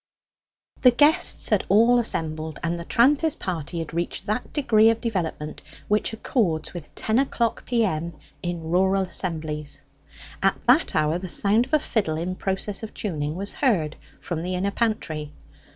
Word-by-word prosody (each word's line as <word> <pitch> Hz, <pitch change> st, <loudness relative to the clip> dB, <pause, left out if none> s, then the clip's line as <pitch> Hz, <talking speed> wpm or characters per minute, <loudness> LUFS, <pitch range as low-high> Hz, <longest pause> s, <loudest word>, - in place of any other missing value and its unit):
The 250 Hz, -, +8 dB
guests 295 Hz, +7 st, +3 dB
had -, -, +2 dB
all 230 Hz, +5 st, +5 dB
assembled, 160 Hz, -7 st, -2 dB
and 170 Hz, +1 st, -1 dB
the 170 Hz, -, -7 dB
tranter's 285 Hz, -, +3 dB
party 170 Hz, -3 st, -4 dB
had 165 Hz, -1 st, -5 dB
reached 170 Hz, +3 st, -3 dB
that 215 Hz, +4 st, -2 dB
degree 225 Hz, -7 st, +4 dB
of 225 Hz, 0 st, +1 dB
development 170 Hz, -9 st, -3 dB, 0.3 s
which 210 Hz, +2 st, +1 dB
accords 210 Hz, -, -1 dB
with 175 Hz, -4 st, -9 dB
ten 220 Hz, +3 st, +1 dB
o'clock 235 Hz, -4 st, -1 dB
P.M. 185 Hz, -9 st, 0 dB, 0.3 s
in 170 Hz, -2 st, -4 dB
rural 190 Hz, +2 st, +3 dB
assemblies. 155 Hz, -5 st, -3 dB, 0.6 s
At -, -, +2 dB
that -, -, +4 dB
hour 155 Hz, +2 st, +1 dB
the 185 Hz, 0 st, -6 dB
sound 210 Hz, +7 st, +3 dB
of 270 Hz, -, -20 dB
a -, -, +4 dB
fiddle 195 Hz, -, -1 dB
in 175 Hz, +3 st, -2 dB
process 195 Hz, +1 st, -2 dB
of 220 Hz, -, -8 dB
tuning 155 Hz, -6 st, -3 dB
was 200 Hz, +3 st, -3 dB
heard 175 Hz, -, +1 dB, 0.2 s
from 170 Hz, -3 st, -4 dB
the 180 Hz, +2 st, -2 dB
inner 195 Hz, +2 st, -1 dB
pantry. 160 Hz, -10 st, -2 dB
185 Hz, 160 wpm, -24 LUFS, 160-225 Hz, 0.6 s, The